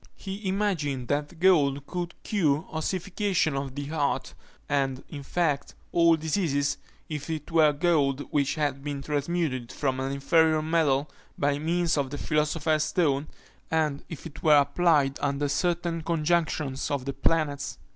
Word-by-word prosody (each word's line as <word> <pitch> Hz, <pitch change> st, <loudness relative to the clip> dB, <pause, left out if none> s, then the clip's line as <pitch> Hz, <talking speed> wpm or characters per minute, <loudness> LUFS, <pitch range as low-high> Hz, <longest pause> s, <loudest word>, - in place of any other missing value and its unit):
He 195 Hz, +1 st, -6 dB
imagined 165 Hz, -, -1 dB
that 145 Hz, +3 st, -2 dB
gold 145 Hz, -7 st, +3 dB
could 175 Hz, +1 st, -4 dB
cure 155 Hz, -8 st, +1 dB
ossification 180 Hz, 0 st, -1 dB
of 135 Hz, -1 st, -4 dB
the 145 Hz, 0 st, -4 dB
heart, 145 Hz, -1 st, -1 dB, 0.3 s
and, 135 Hz, -2 st, 0 dB
in 145 Hz, -3 st, -7 dB
fact, 150 Hz, -1 st, -1 dB, 0.2 s
all 170 Hz, -1 st, +5 dB
diseases, 155 Hz, -3 st, 0 dB, 0.3 s
if 150 Hz, 0 st, -5 dB
it 155 Hz, 0 st, -4 dB
were 160 Hz, -2 st, +5 dB
gold 145 Hz, -3 st, +1 dB
which 145 Hz, 0 st, +1 dB
had 145 Hz, -3 st, -1 dB
been 140 Hz, -1 st, -4 dB
transmuted 145 Hz, -4 st, -1 dB
from 130 Hz, -2 st, -1 dB
an 135 Hz, +1 st, -2 dB
inferior 155 Hz, +3 st, +3 dB
metal 155 Hz, -3 st, +2 dB, 0.3 s
by 145 Hz, 0 st, +1 dB
means 170 Hz, +1 st, +1 dB
of 135 Hz, -2 st, -1 dB
the 145 Hz, -, -5 dB
philosopher's 155 Hz, +1 st, +1 dB
stone, 150 Hz, -5 st, +1 dB, 0.4 s
and 155 Hz, -3 st, 0 dB
if 165 Hz, -, -8 dB
it 160 Hz, -2 st, -9 dB
were 150 Hz, -2 st, +6 dB
applied 145 Hz, -1 st, +3 dB
under 145 Hz, 0 st, 0 dB
certain 170 Hz, +2 st, 0 dB
conjunctions 155 Hz, -4 st, 0 dB
of 140 Hz, -3 st, -2 dB
the 140 Hz, -, -2 dB
planets. 140 Hz, -, 0 dB
150 Hz, 145 wpm, -27 LUFS, 140-165 Hz, 0.4 s, were